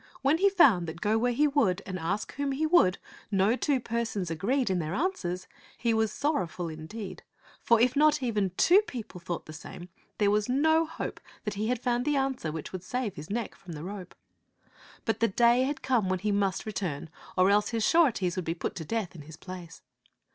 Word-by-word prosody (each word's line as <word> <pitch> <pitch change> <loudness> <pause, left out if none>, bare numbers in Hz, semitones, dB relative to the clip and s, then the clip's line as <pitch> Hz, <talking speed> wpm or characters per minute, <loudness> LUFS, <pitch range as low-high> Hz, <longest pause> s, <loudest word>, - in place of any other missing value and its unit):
When 290 +4 +3
he 400 +1 +5
found 250 - +5
that, 160 +1 -6
go 210 +3 +1
where 245 +2 +2
he 295 +5 +3
would 215 -10 +1
and 185 -1 -4
ask 190 +6 -2
whom 280 0 -2
he 300 +4 0
would, 310 - +4 0.3
no 200 +3 +3
two 275 0 +1
persons 225 -7 -2
agreed 220 - 0
in 185 - +1
their 160 +1 -3
answers, 195 - -2 0.3
he 235 -2 +1
was 220 -1 +1
sorrowful 185 - -1
in 155 0 -8
deed; 210 0 -7 0.4
for 235 -1 +4
if 245 +2 +3
not 300 -2 +4
even 210 -5 +1
two 375 +4 +6
people 225 -6 -7
thought 175 -1 -5
the 155 - -9
same, 175 +3 -9 0.3
there 205 -1 +3
was 210 +2 +1
no 315 +5 +3
hope 320 - -5 0.2
that 210 - -3
he 210 +2 -2
had 250 0 0
found 245 0 0
the 295 -1 +1
answer 270 - -1
which 160 -1 -6
would 185 -1 -6
save 245 0 -2
his 150 +1 -9
neck 225 +1 -3
from 175 -3 -11
the 150 0 -7
rope. 190 0 -7 0.9
But 225 -1 0
the 230 - +4
day 240 +4 +4
had 285 +1 -3
come 235 -8 +1
when 185 - +1
he 210 +3 -1
must 195 -2 0
return, 185 -8 -4 0.3
or 185 +2 +5
else 205 +1 +3
his 225 -2 0
sureties 240 - +3
would 185 - -2
be 165 - -1
put - - -3
to 165 - -4
death 220 +2 -3
in 165 - -10
his 155 +2 -12
place. 180 -3 -10
210 Hz, 215 wpm, -29 LUFS, 180-255 Hz, 0.9 s, two